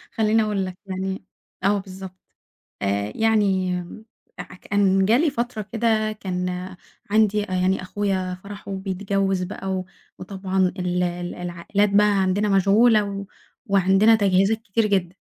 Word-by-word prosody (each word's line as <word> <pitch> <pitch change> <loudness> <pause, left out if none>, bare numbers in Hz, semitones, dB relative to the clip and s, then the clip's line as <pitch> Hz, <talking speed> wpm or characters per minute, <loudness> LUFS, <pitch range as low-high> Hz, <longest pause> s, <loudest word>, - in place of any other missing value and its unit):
خلّيني 220 0 +3
أقول 205 -3 -1
لك 185 -1 -7
يعني، 190 0 -4 0.4
آه 200 +2 +3
بالضبط، 190 -1 -9 0.7
آآ، 100 +1 -1
يعني 200 -5 +2 0.7
أع - - -5
كان 195 0 +1
جِه 225 +4 +4
لي 315 +3 +2
فترة 240 -4 -3
كده 220 -1 +1
كان 180 -3 -3 0.6
عندي 210 -1 +3
أ 190 - -10
يعني 185 +1 +1
أخويا 185 -1 -2
فرحُه 200 0 -9
وبيتجوّز 195 0 -1
بقى 195 +1 -6
و 185 -1 -3 0.3
وطبعًا 190 -1 -1
ال 180 0 0
ال 175 0 -3
العائلات 180 +4 -1
بقى 205 +1 +4 0.2
عندنا 200 +3 +1
مشغولة 210 +3 +4
و 200 0 -5 0.4
وعندنا 195 +3 +4
تجهيزات 195 +1 +2
كتير 225 +1 0
جدًا، 185 -3 0
195 Hz, 135 wpm, -23 LUFS, 185-210 Hz, 0.7 s, جِه